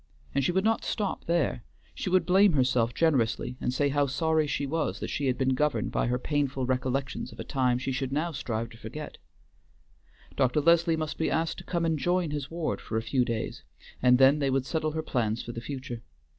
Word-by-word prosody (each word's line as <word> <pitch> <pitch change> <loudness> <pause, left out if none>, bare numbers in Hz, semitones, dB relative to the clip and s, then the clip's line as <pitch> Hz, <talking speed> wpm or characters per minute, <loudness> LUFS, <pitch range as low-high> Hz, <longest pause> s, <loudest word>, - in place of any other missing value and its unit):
And 140 - +1
she 160 - +2
would 190 +2 +1
not 225 +1 +2
stop 205 -3 -2
there; 170 - 0 0.3
she - - -3
would 180 -2 +3
blame 190 +1 +5
herself 125 -4 +2
generously 125 -5 +1
and - - 0
say 140 +3 +1
how 145 0 +2
sorry 160 +2 +1
she 140 - -1
was 160 +3 -1
that - - -4
she 145 - -1
had 130 - +1
been 130 0 +2
governed 130 -5 0
by - - 0
her 125 +1 +1
painful 135 -1 -1
recollections 130 +1 -2
of - - -14
a - - -3
time 125 -3 +1
she 130 +1 -3
should 130 0 -2
now 155 +5 0
strive 115 -5 -3
to 115 - -14
forget. 150 +8 -8 1.2
Dr. 130 +1 +2
Leslie 165 +1 +4
must 155 -2 -4
be 160 - +1
asked 165 +1 -1
to - - -10
come 170 -1 -1
and 160 -2 +1
join 175 0 +1
his 145 -2 -4
ward 165 -1 -2
for 110 - -3
a 110 - -1
few 125 +2 +1
days, 115 -2 -3 0.4
and 125 0 +6
then 135 +3 +6
they 140 -2 +1
would 130 -1 +1
settle 155 0 -1
her 160 0 -2
plans 115 -5 -1
for 120 - -6
the 115 - -6
future. 130 -2 -6
140 Hz, 220 wpm, -28 LUFS, 125-160 Hz, 1.2 s, and